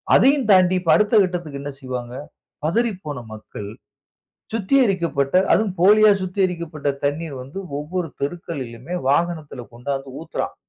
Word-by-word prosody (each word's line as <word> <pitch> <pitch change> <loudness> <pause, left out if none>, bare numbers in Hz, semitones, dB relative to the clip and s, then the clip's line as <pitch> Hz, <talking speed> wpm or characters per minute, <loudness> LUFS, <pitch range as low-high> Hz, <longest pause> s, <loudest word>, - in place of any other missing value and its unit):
அதையும் 270 -3 +4
தாண்டி 185 -1 +5
இப்ப 170 -3 +1
அடுத்த 210 +1 +2
கட்டத்திற்கு 175 -6 -4
என்ன 145 - -4
செய்வாங்க, 125 -2 -5 0.5
பதறிப்போன 180 - -1
மக்கள். 105 -1 -8 0.9
சுத்திகரிக்கப்பட்ட 190 - +1 0.2
அதுவும் 215 -4 +2
போலியா 210 +3 +7
சுத்திகரிக்கப்பட்ட 175 -5 -2 0.2
தண்ணீர் 145 +1 -1
வந்து 135 +9 -8 0.2
ஒவ்வொரு 165 +3 -3
தெருக்களிலுமே 140 -3 -5
வாகனத்துல 155 -4 0
கொண்டாந்து 135 +3 -4
ஊத்துறான். 165 - -4
165 Hz, 110 wpm, -22 LUFS, 140-185 Hz, 0.9 s, போலியா